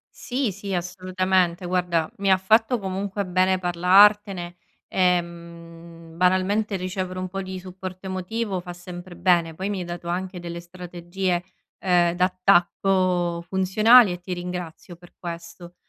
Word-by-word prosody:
Sì, 250 Hz, -3 st, -2 dB
sì, 200 Hz, 0 st, -6 dB
assolutamente 185 Hz, 0 st, 0 dB
guarda, 175 Hz, -3 st, 0 dB
mi 195 Hz, -1 st, +1 dB
ha 190 Hz, -, +6 dB
fatto 220 Hz, +5 st, +3 dB
comunque 195 Hz, +1 st, -3 dB
bene 185 Hz, +1 st, +2 dB
parlartene, 185 Hz, +1 st, +4 dB, 0.3 s
ehm, 170 Hz, -2 st, -3 dB
banalmente 185 Hz, +4 st, +2 dB
ricevere 185 Hz, 0 st, -4 dB
un 185 Hz, -, -3 dB
po' 195 Hz, +1 st, -5 dB
di 185 Hz, 0 st, -6 dB
supporto 185 Hz, 0 st, -8 dB
emotivo 190 Hz, +1 st, -3 dB
fa 175 Hz, 0 st, -8 dB
sempre 175 Hz, 0 st, -10 dB
bene. 170 Hz, -3 st, +2 dB
Poi 190 Hz, +5 st, -4 dB
mi 200 Hz, -, -2 dB
hai 180 Hz, -, -4 dB
dato 175 Hz, 0 st, -7 dB
anche 180 Hz, +1 st, -3 dB
delle 170 Hz, 0 st, -6 dB
strategie, 175 Hz, +1 st, -4 dB, 0.3 s
ehm, 175 Hz, -2 st, +2 dB
d'attacco 180 Hz, -1 st, +2 dB
funzionali 200 Hz, +4 st, +5 dB
e 175 Hz, -, -5 dB
ti 180 Hz, +1 st, -5 dB
ringrazio 175 Hz, -1 st, -6 dB
per 175 Hz, +1 st, -18 dB
questo. 170 Hz, 0 st, -9 dB
180 Hz, 135 wpm, -24 LUFS, 175-190 Hz, 0.3 s, ha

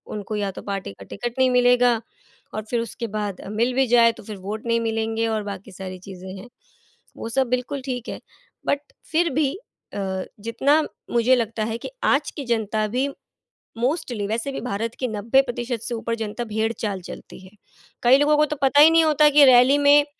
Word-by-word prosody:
उनको 210 Hz, +1 st, -5 dB
या 200 Hz, -2 st, -1 dB
तो -, -, -9 dB
पार्टी 195 Hz, -, -4 dB
का 100 Hz, -, -13 dB
टिकट 235 Hz, -, -5 dB
नहीं 260 Hz, 0 st, +5 dB
मिलेगा 245 Hz, -2 st, +4 dB, 0.5 s
और 215 Hz, -, -3 dB
फिर 240 Hz, -, 0 dB
उसके 230 Hz, +1 st, -5 dB
बाद 210 Hz, -3 st, -4 dB
मिल 235 Hz, +4 st, +1 dB
भी 265 Hz, 0 st, +3 dB
जाए 235 Hz, -1 st, +5 dB
तो -, -, -13 dB
फिर 210 Hz, -1 st, -8 dB
वोट 215 Hz, +4 st, -5 dB
नहीं 230 Hz, 0 st, +2 dB
मिलेंगे 225 Hz, 0 st, -1 dB
और 220 Hz, -1 st, -1 dB
बाकी 200 Hz, -2 st, -7 dB
सारी 185 Hz, 0 st, -7 dB
चीज़ें 190 Hz, 0 st, -10 dB
हैं। 215 Hz, -, -10 dB, 0.7 s
वो 230 Hz, -, -5 dB
सब 265 Hz, +2 st, +1 dB
बिल्कुल 250 Hz, +2 st, -2 dB
ठीक 250 Hz, -2 st, -4 dB
है -, -, -5 dB, 0.5 s
बट 285 Hz, -, +2 dB, 0.3 s
फिर 335 Hz, +2 st, +2 dB
भी 290 Hz, -1 st, +2 dB, 0.4 s
अ, 190 Hz, -2 st, -3 dB, 0.2 s
जितना 265 Hz, +8 st, +2 dB, 0.3 s
मुझे 240 Hz, +2 st, +4 dB
लगता 225 Hz, -2 st, -2 dB
है 225 Hz, 0 st, -3 dB
कि -, -, -7 dB
आज 285 Hz, +2 st, +2 dB
की 285 Hz, -, -7 dB
जनता 220 Hz, -2 st, 0 dB
भी 265 Hz, +2 st, +1 dB, 0.7 s
मोस्टली 245 Hz, -, -1 dB
वैसे 230 Hz, +6 st, -2 dB
भी -, -, -5 dB
भारत 230 Hz, 0 st, -3 dB
की 255 Hz, -, -1 dB
90% 240 Hz, +1 st, 0 dB
से 240 Hz, 0 st, -4 dB
ऊपर 230 Hz, 0 st, -3 dB
जनता 220 Hz, +1 st, -4 dB
भेड़-चाल 220 Hz, -2 st, -2 dB
चलती 175 Hz, -, -10 dB
है। 185 Hz, -, -14 dB, 0.5 s
कई 245 Hz, +2 st, +7 dB
लोगों 295 Hz, +1 st, +4 dB
को 300 Hz, -, +5 dB
तो 300 Hz, -, -4 dB
पता 275 Hz, +2 st, +5 dB
ही 310 Hz, -, +9 dB
नहीं 330 Hz, 0 st, +5 dB
होता 300 Hz, -1 st, +5 dB
कि 290 Hz, -, +10 dB
रैली 255 Hz, +2 st, +6 dB
में 290 Hz, 0 st, +6 dB
230 Hz, 195 wpm, -23 LUFS, 215-265 Hz, 0.7 s, कि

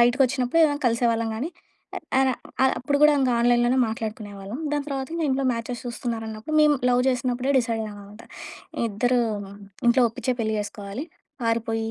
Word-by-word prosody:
బయటికొచ్చినప్పుడు 255 Hz, +4 st, +3 dB, 0.2 s
కలిసేవాళ్ళం 230 Hz, -1 st, +1 dB
గానీ. 280 Hz, +9 st, -3 dB, 0.7 s
అర 265 Hz, -, +4 dB, 0.3 s
అర 265 Hz, -, +6 dB
అప్పుడు 285 Hz, +3 st, 0 dB
గూడా 300 Hz, 0 st, +8 dB
ఇంకా 255 Hz, -2 st, +2 dB
ఆన్‌లైన్‌లోనే 240 Hz, +1 st, +3 dB
మాట్లాడుకునేవాళ్ళం. 215 Hz, -1 st, -6 dB
దాని 290 Hz, -1 st, 0 dB
తర్వాత 270 Hz, -2 st, -3 dB
ఇంకా 330 Hz, -, -1 dB
ఇంట్లో 265 Hz, +1 st, 0 dB
మ్యాచెస్ 235 Hz, +1 st, -5 dB
చూస్తున్నారన్నప్పుడు 230 Hz, +2 st, -4 dB
మేము 300 Hz, -1 st, +5 dB
లవ్ 245 Hz, 0 st, +3 dB
జేసినప్పుడే 255 Hz, +1 st, 0 dB
డిసైడ్ 230 Hz, -2 st, -1 dB
అయ్యాం 210 Hz, -1 st, -8 dB
అనమాట. 205 Hz, +3 st, -13 dB, 0.7 s
ఇద్దరు 245 Hz, +4 st, +1 dB, 0.7 s
ఇంట్లో 245 Hz, +2 st, +5 dB
ఒప్పించే 255 Hz, +2 st, -2 dB
పెళ్లి 220 Hz, -1 st, 0 dB
జేసుకోవాలి. 205 Hz, +5 st, -6 dB, 0.4 s
పారిపోయి 225 Hz, -1 st, -1 dB
240 Hz, 140 wpm, -24 LUFS, 225-260 Hz, 0.7 s, గూడా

